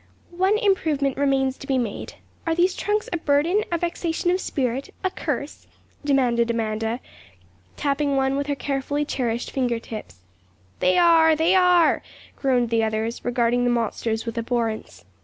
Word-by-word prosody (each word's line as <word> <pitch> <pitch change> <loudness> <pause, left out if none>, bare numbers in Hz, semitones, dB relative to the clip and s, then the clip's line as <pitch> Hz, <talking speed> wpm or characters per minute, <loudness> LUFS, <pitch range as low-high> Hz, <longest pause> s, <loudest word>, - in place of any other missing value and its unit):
'One 375 +4 +2
improvement 315 - +1
remains 270 -1 +1
to 275 - -10
be 270 - +1
made. 230 -5 -4 0.3
Are 325 - +2
these 360 +2 +3
trunks 420 +1 -1
a - - +1
burden, 320 +7 +2
a 340 - +1
vexation 340 0 -1
of 370 +1 0
spirit, 260 -1 -2
a 375 - +1
curse?' 285 -3 -4 0.4
demanded 245 -5 +2
Amanda, 225 0 -1 0.8
tapping 280 0 0
one 270 0 +1
with 280 +1 -2
her 285 - 0
carefully 285 +1 -2
cherished 240 -4 -2
finger 245 -3 0
tips. 215 - -9 0.6
'They 185 - +3
are! 330 -2 +6
they 325 +4 +3
are!' 360 -3 +4 0.3
groaned 250 -4 +1
the 225 -1 +2
others, 220 +1 -2
regarding 245 0 +1
the 245 - +2
monsters 230 -1 -1
with 230 0 -3
abhorrence. 225 - -3
270 Hz, 155 wpm, -23 LUFS, 235-325 Hz, 0.8 s, are